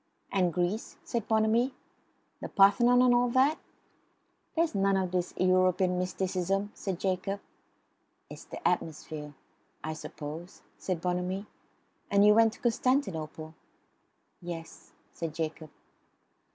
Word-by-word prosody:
"And 180 -3 +2
Greece?" 180 +6 -2
said 230 -3 -3
Bonamy. 225 +4 +2 0.7
"The - - -5
Parthenon 240 +5 +5
and 250 -1 +5
all 245 0 +3
that?" 265 +5 +3 1.0
"There's 330 0 +2
none 195 -1 +2
of 185 -2 -1
this 180 -1 -1
European 185 0 +3
mysticism," 190 +2 -1
said 190 -3 -4
Jacob. 195 +1 -1 0.9
"It's - - -11
the - - -3
atmosphere. 150 -2 -3 0.5
I 155 - -3
suppose," 155 +3 -8 0.2
said 180 -4 -2
Bonamy. 180 +2 -1 0.6
"And 200 0 +5
you 210 - +8
went 225 0 +5
to - - -15
Constantinople?" 190 - 0 0.9
"Yes," 170 -2 -8 0.2
said 165 -2 -5
Jacob. 160 -1 -4
185 Hz, 115 wpm, -29 LUFS, 175-220 Hz, 1.0 s, you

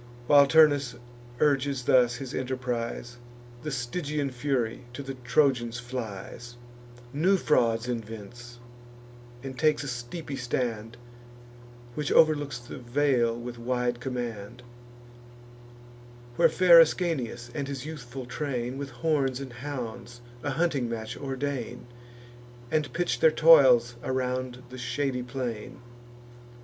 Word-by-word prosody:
While 140 +2 +7
Turnus 145 -4 +4 0.4
urges 140 -3 +1
thus 120 -1 +4
his 125 0 -7
enterprise, 125 -2 -3 0.4
The 150 - -4
Stygian 140 +2 -2
Fury 125 -2 -2
to 140 - -6
the 135 0 -5
Trojans 125 -2 +1
flies; 120 -1 -7 0.6
New 180 +7 +3
frauds 115 -8 +2
invents, 120 +1 -7 0.9
and 130 -1 -7
takes 155 -1 +2
a - - -5
steepy 135 +4 -5
stand, 120 -2 -3 1.0
Which 150 +3 -3
overlooks 145 -4 +4
the 120 0 -9
vale 120 -2 +1
with 120 0 -7
wide 125 0 -1
command; 120 -2 -5 1.7
Where - - +5
fair 175 -2 +7
Ascanius 140 -8 +1
and 145 -3 -3
his 140 -1 -5
youthful 135 -5 -7
train, 125 -1 -3
With 140 -1 -5
horns 135 0 0
and 135 -3 -7
hounds, 120 -2 -7 0.2
a 145 - -2
hunting 145 -4 0
match 110 -1 -5
ordain, 135 -3 -4 0.9
And 155 -4 0
pitch 175 +6 -1
their 160 - +6
toils 135 -7 +6
around 130 -1 -2
the 130 0 -9
shady 130 +1 -2
plain. 120 -3 -5
125 Hz, 115 wpm, -27 LUFS, 120-145 Hz, 1.7 s, While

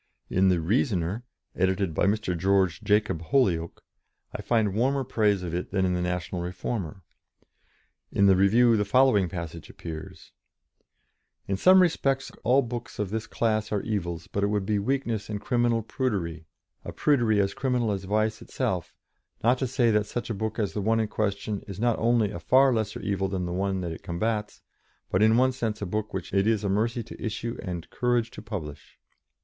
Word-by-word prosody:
In 95 +1 +4
the 90 -2 +3
Reasoner, 100 - 0 0.3
edited 95 -1 +1
by 80 - +2
Mr. 105 -3 0
George 95 0 +2
Jacob 105 -5 +1
Holyoake, 85 -4 +1 0.5
I - - -4
find 110 -4 +1
warmer 135 +5 +1
praise 105 -6 +1
of 85 -2 -4
it 90 +1 -3
than 95 -1 +1
in 90 - +1
the 90 - -1
National 90 0 -2
Reformer; 90 0 -4 1.1
in 100 - +3
the 95 -1 +6
review 115 +5 +5
the 105 - +2
following 105 -4 +3
passage 85 -3 -7
appears: 80 -2 -9 1.2
"In 95 - 0
some 185 - +6
respects 135 -6 0
all 130 +5 +4
books 120 0 -6
of 105 -2 -2
this 110 0 -3
class 110 -2 0
are 105 -2 -1
evils: 85 -6 -3
but 100 - -3
it - - +3
would 105 -1 -1
be 105 0 +1
weakness 115 -2 -1
and 105 -1 -3
criminal 120 0 +1
prudery 95 - -2 0.4
a - - -6
prudery 120 -8 +2
as 100 -1 +1
criminal 125 -4 0
as 95 -1 -3
vice 110 +2 0
itself - - -3 0.5
not 125 +3 +3
to 130 - 0
say 120 -2 +2
that 105 -1 +1
such 120 +1 -4
a - - -1
book 110 +2 -3
as 105 -4 -1
the 105 - -2
one 110 +3 +2
in 110 - +1
question 100 -1 -2
is 100 -1 -7
not 120 0 +1
only 115 -3 +2
a - - -6
far 130 0 +4
lesser 110 -2 -2
evil 95 -1 -1
than 95 -2 -2
the 85 - -3
one 95 0 -1
that 85 -2 -3
it 80 - -8
combats, 105 +4 -3 0.5
but 95 - +2
in 110 +1 +5
one 130 +1 +4
sense 115 -4 -3
a 100 - -3
book 105 +3 -3
which 95 -2 -5
it 100 +1 +2
is 110 -2 +2
a 100 - 0
mercy 115 +4 0
to 115 - -11
issue 115 +1 -3
and 90 -4 -5
courage 120 -1 0
to - - -9
publish." 85 -9 -7
105 Hz, 190 wpm, -27 LUFS, 95-115 Hz, 1.2 s, the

